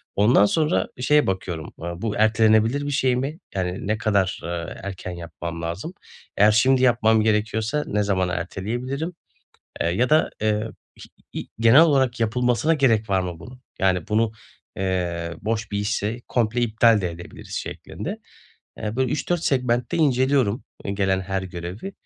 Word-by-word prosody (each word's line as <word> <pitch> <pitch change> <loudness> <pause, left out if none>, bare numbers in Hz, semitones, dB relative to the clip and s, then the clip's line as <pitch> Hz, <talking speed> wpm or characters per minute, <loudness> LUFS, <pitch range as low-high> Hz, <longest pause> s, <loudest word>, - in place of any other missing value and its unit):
Ondan 105 +1 +5
sonra 155 - +1
şeye 150 +4 +3
bakıyorum, 90 -4 -3
aaa, 85 +1 -6
bu 110 -2 -2
ertelenebilir 110 +5 +3
bir - - -2
şey 130 -3 +2
mi? 140 +6 -3 0.2
Yani, 90 0 -3
ne 105 +1 +1
kadar, 100 -4 +1
ııı, 85 0 -4
erken 95 -2 -6
yapmam 85 -1 -7
lazım? 85 - -4 0.4
Eğer 105 +2 +6
şimdi 130 +4 +4
yapmam 110 -3 +4
gerekiyorsa 110 +5 0
ne 105 0 0
zamana 95 -3 0
erteleyebilirim, 120 - -3 0.7
eee, - - +1
ya 110 +9 +1
da, 155 +1 +4
eee, 110 +1 0 0.3
iş, - - -13 0.3
i - - -3
i - - -12
genel 115 +6 +7
olarak 135 -6 +3
yapılmasına 125 +6 +2
gerek 115 -8 +2
var 95 -1 +2
mı 90 -3 -5
bunun? 125 +8 -12 0.2
Yani 95 -1 +1
bunu, 110 +1 +2 0.5
eee, 90 -3 -2
boş 110 0 -2
bir 100 - -1
işse 105 +3 -2
komple 120 0 0
iptal 115 -1 +4
de 90 -2 -2
edebiliriz, 85 +1 -10
şeklinde. - - -6 0.6
Eee, 110 +1 -4
bu 130 - +2
3-4 155 +6 -1
segmentte 125 -3 0
inceliyorum, 130 -6 +2 0.2
i 100 - -2
gelen 95 -1 +1
her 95 0 -3
görevi, 90 - -7
110 Hz, 160 wpm, -23 LUFS, 95-125 Hz, 0.7 s, genel